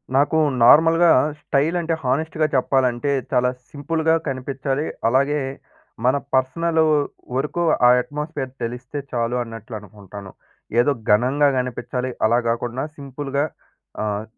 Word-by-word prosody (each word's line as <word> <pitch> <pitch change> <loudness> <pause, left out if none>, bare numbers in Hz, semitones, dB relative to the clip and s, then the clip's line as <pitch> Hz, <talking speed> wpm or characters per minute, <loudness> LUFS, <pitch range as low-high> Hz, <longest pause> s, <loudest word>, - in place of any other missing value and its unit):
నాకు 145 +3 +3 0.3
నార్మల్‌గా 165 +6 +6 0.3
స్టైల్ 145 +5 0
అంటే 165 0 -1
హానెస్ట్‌గా 155 +4 0
చెప్పాలంటే 130 +1 +1 0.2
చాలా 125 -1 +3 0.2
సింపుల్‌గా 160 +2 0
కనిపిచ్చాలి. 135 +2 -2 0.2
అలాగే 140 +5 +2 0.7
మన 130 - +4 0.2
పర్సనలూ 160 +5 +2 0.5
వరకు 150 +5 -1 0.2
ఆ - - +7
అట్మాస్ఫియర్ 145 -1 -5
తెలిస్తే 125 +4 -5
చాలు 120 0 -1
అన్నట్లు 115 -1 -9
అనుకుంటాను. 100 -1 -11 0.5
ఏదో 125 +4 +4 0.2
ఘనంగా 130 +7 +3
కనిపిచ్చాలి, 125 0 -3 0.2
అలా 120 +2 +3
గాకుండా 120 +3 -2
సింపుల్‌గా 140 0 -3 0.6
ఆహ్, 105 0 -2
135 Hz, 110 wpm, -21 LUFS, 120-150 Hz, 0.7 s, ఆ